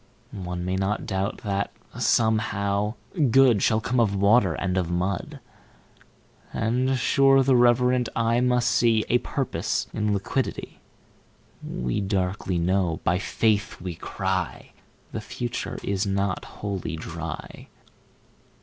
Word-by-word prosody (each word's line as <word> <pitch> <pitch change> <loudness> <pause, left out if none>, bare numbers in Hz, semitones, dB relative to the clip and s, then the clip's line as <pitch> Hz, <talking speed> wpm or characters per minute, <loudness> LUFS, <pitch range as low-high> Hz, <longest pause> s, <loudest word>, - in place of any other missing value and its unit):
9One 90 -2 -4
may 90 +1 -1
not 95 +2 -1
doubt 95 0 -2
that, 100 -1 -1 0.3
somehow, 105 -2 +1 0.2
Good10Shall 125 - +4
come 125 +1 0
of 105 -4 +2
Water 100 -3 +4
and 90 0 -2
of 90 -3 0
Mud;11And, 110 +6 -4
sure, 135 +1 +4
the 130 0 +4
reverent 125 0 +3
eye 115 +1 +2
must 125 -1 +2
see12A 115 +1 +3
Purpose 135 -3 -2
in 105 -1 0
Liquidity.13We 100 - -5
darkly 95 -2 -1
know, 90 -1 +1
by 90 +1 +2
Faith 105 +4 0
we 90 0 -5
cry,14The - - -5
future 120 -1 -4
is 100 +1 -1
not 100 -1 -1
Wholly 100 -4 -5
Dry. 85 0 -7
105 Hz, 105 wpm, -25 LUFS, 95-120 Hz, 0.3 s, Good10Shall